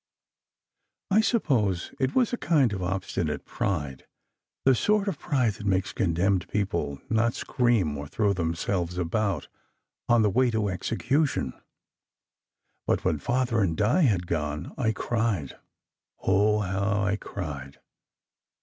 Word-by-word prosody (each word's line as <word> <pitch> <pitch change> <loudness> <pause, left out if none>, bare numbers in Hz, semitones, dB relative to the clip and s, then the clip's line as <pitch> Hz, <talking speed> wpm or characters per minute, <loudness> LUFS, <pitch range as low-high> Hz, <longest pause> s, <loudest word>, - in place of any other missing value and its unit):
I 210 +3 +6
suppose 125 - +1
it 130 -1 0
was 250 -2 +3
a - - +3
kind 140 - +2
of 95 - -4
obstinate 90 -3 -2
pride, 75 -9 -3 0.6
the 135 - +6
sort 210 - +2
of 185 -7 -2
pride 130 -9 +1
that 100 0 -7
makes 95 0 +1
condemned 90 +1 +1
people 85 -9 -2
not 115 +1 +1
scream 115 - +1
or 70 0 -6
throw 105 +4 +1
themselves 85 0 -2
about 90 -1 -1 0.6
on 120 -2 +5
the 105 - +4
way 125 +4 +3
to 110 -3 0
execution. 115 - 0 1.3
But - - +1
when 75 - +1
Father 120 - 0
and 85 -5 0
Di 120 - +3
had 100 - +2
gone, 75 -1 -3
I 120 -5 +1
cried 110 - -1 0.7
oh, 105 +2 +3
how 100 +2 0
I 100 -1 +1
cried! 75 -10 -7
100 Hz, 130 wpm, -27 LUFS, 85-120 Hz, 1.3 s, I